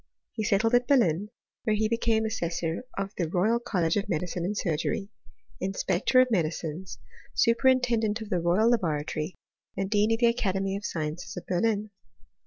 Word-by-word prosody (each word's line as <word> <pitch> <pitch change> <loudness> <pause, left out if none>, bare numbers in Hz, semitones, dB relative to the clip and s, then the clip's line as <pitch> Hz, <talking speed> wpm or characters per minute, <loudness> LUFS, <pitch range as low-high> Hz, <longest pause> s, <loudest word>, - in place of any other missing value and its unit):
He 220 - -3
settled 215 +3 +2
at 245 0 +4
Berlin, 205 - +3 0.3
where 215 - +1
he 215 +1 +1
became 225 -1 +1
assessor 170 -2 -2
of 195 +1 -3
the 170 -3 0
Royal 210 +7 +2
College 180 -7 0
of 200 - -2
Medicine 175 +1 -2
and 200 +4 -2
Surgery, 195 +5 -1 0.5
inspector 190 +5 +1
of 255 -1 +4
medicines, 165 - -2 0.4
superintendent 235 -2 +3
of 220 -2 -8
the 180 - +2
Royal 180 +7 +3
Laboratory, 155 -5 -1 0.4
and 195 0 -2
dean 210 +1 +3
of 225 - +3
the 240 - +3
Academy 195 -4 +1
of 200 - -5
Sciences 155 0 -4
of - - -6
Berlin. 210 +3 0
200 Hz, 160 wpm, -27 LUFS, 175-225 Hz, 0.5 s, at